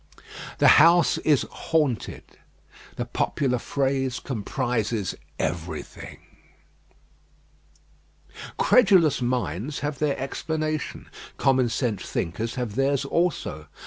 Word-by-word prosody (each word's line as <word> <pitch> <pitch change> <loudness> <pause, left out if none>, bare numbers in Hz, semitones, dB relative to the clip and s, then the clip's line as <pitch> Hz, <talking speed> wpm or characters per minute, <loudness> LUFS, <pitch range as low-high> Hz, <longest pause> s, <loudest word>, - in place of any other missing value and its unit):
The - - +7
house 170 +1 +5
is 150 -4 +2
"haunted;" 150 -8 -1 0.7
the - - -3
popular 125 -3 -1
phrase 135 0 -1
comprises 115 -3 -2 0.2
everything. 85 0 -5 2.4
Credulous 185 - +4
minds 120 - -2
have 145 -1 -3
their 150 -2 0
explanation; 155 +3 -3 0.3
common 130 -2 +2
sense 115 -4 -1
thinkers 110 +7 -3
have 120 -5 -3
theirs 135 +3 +1
also. 140 - -1
135 Hz, 85 wpm, -25 LUFS, 115-150 Hz, 2.4 s, The